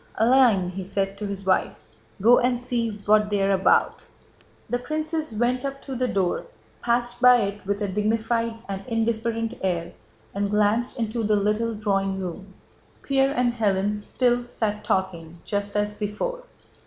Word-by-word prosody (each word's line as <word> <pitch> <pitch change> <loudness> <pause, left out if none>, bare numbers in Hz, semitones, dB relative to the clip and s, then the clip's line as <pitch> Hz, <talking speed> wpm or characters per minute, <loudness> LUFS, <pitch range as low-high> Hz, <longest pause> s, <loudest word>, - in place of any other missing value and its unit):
"Aline," 225 -5 +4
he 190 +1 -5
said 195 +1 -2
to 210 - -3
his 200 -1 -6
wife, 185 -1 +1 0.5
"go 240 +3 +7
and 245 0 +1
see 240 -2 -1 0.2
what 210 0 +4
they 205 -1 +1
are 195 - +2
about." 190 0 +2 0.6
The 245 - -1
princess 310 +2 -2
went 240 +4 0
up 275 0 -4
to 270 - -6
the 255 +1 0
door, 190 -6 -1 0.3
passed 240 0 -1
by 250 -1 +7
it 200 -1 -4
with 200 +1 -1
a - - 0
dignified 225 +3 0
and 195 0 -5
indifferent 230 0 -1
air, 175 -3 -2 0.4
and 200 0 -1
glanced 210 +5 +1
into 230 0 -2
the 210 0 +2
little 210 +3 0
drawing 195 -2 -1
room. 190 +1 -7 0.5
Pierre 275 0 +2
and 245 -2 +2
Hélène 205 -3 +1
still 245 +3 0
sat 215 -3 -3
talking 175 -5 -2
just 205 0 -3
as 210 0 0
before. 225 - -4
215 Hz, 160 wpm, -24 LUFS, 200-240 Hz, 0.6 s, go